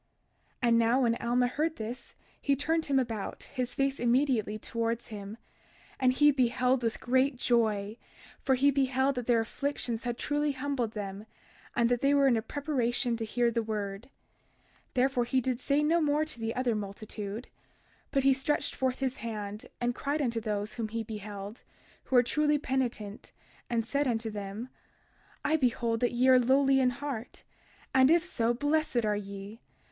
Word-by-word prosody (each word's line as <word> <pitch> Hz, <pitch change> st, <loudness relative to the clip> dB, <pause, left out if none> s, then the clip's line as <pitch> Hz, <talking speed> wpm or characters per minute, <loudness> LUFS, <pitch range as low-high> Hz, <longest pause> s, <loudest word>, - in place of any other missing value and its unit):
32:6 -, -, +4 dB
And 230 Hz, -, +5 dB
now 230 Hz, +3 st, +3 dB
when 230 Hz, -2 st, +3 dB
Alma 245 Hz, +1 st, +1 dB
heard 305 Hz, +6 st, -1 dB
this, 230 Hz, +3 st, -7 dB, 0.3 s
he 280 Hz, -, +2 dB
turned 320 Hz, +4 st, 0 dB
him 275 Hz, -1 st, +2 dB
about, 230 Hz, -6 st, -2 dB
his 250 Hz, -2 st, -4 dB
face 275 Hz, 0 st, 0 dB
immediately 240 Hz, -3 st, +2 dB
towards 230 Hz, +2 st, -3 dB
him, 205 Hz, 0 st, -7 dB, 0.6 s
and 255 Hz, -1 st, +4 dB
he 295 Hz, +3 st, +5 dB
beheld 255 Hz, -1 st, +2 dB
with 230 Hz, -2 st, -1 dB
great 260 Hz, +2 st, +2 dB
joy; 220 Hz, -4 st, +1 dB, 0.5 s
for 265 Hz, -, +3 dB
he 280 Hz, +3 st, +4 dB
beheld 270 Hz, 0 st, +2 dB
that 245 Hz, -3 st, -5 dB
their 235 Hz, -2 st, +4 dB
afflictions 240 Hz, -1 st, -3 dB
had 240 Hz, -1 st, -3 dB
truly 295 Hz, +1 st, 0 dB
humbled 265 Hz, -4 st, -2 dB
them 205 Hz, 0 st, -6 dB, 0.5 s
and 235 Hz, -1 st, +3 dB
that 245 Hz, -1 st, +1 dB
they 280 Hz, +1 st, +4 dB
were 280 Hz, -1 st, +4 dB
in 260 Hz, -3 st, +5 dB
a 225 Hz, -, +1 dB
preparation 245 Hz, -3 st, -1 dB
to 230 Hz, -, -4 dB
hear 240 Hz, +2 st, +1 dB
the 230 Hz, 0 st, 0 dB
word. 210 Hz, +1 st, -4 dB, 0.6 s
32:7 -, -, -30 dB, 0.2 s
Therefore 255 Hz, -1 st, +2 dB
he 260 Hz, +2 st, +1 dB
did 255 Hz, -1 st, -1 dB
say 280 Hz, +3 st, +1 dB
no 330 Hz, +3 st, +3 dB
more 300 Hz, 0 st, +2 dB
to 310 Hz, -6 st, -7 dB
the 225 Hz, +1 st, -2 dB
other 250 Hz, -2 st, +1 dB
multitude; 210 Hz, +1 st, -5 dB, 0.6 s
but 275 Hz, -2 st, +1 dB
he 270 Hz, 0 st, +6 dB
stretched 275 Hz, +3 st, -1 dB
forth 260 Hz, -1 st, -1 dB
his 260 Hz, -1 st, -1 dB
hand, 210 Hz, -2 st, -5 dB
and 245 Hz, 0 st, 0 dB
cried 285 Hz, +4 st, -2 dB
unto 235 Hz, -5 st, 0 dB
those 210 Hz, -1 st, -2 dB
whom 230 Hz, -2 st, -3 dB
he 225 Hz, +1 st, -3 dB
beheld, 210 Hz, 0 st, -7 dB, 0.4 s
who 265 Hz, -, -1 dB
were 245 Hz, -, +7 dB
truly 300 Hz, +4 st, +2 dB
penitent, 245 Hz, -7 st, -3 dB, 0.4 s
and 230 Hz, -2 st, 0 dB
said 280 Hz, +4 st, 0 dB
unto 225 Hz, -2 st, -1 dB
them: 205 Hz, +4 st, -6 dB, 0.8 s
32:8 -, -, +1 dB
I -, -, +5 dB
behold 235 Hz, -4 st, +1 dB
that 245 Hz, -, +1 dB
ye 250 Hz, +2 st, +2 dB
are 260 Hz, -1 st, +7 dB
lowly 270 Hz, +2 st, +4 dB
in 255 Hz, -1 st, +4 dB
heart; 250 Hz, -2 st, -6 dB, 0.5 s
and 260 Hz, 0 st, +6 dB
if 335 Hz, +1 st, +5 dB
so, 235 Hz, -10 st, +1 dB
blessed 290 Hz, -2 st, +1 dB
are 210 Hz, -1 st, +1 dB
ye. 200 Hz, +2 st, -7 dB
245 Hz, 180 wpm, -30 LUFS, 225-270 Hz, 0.8 s, were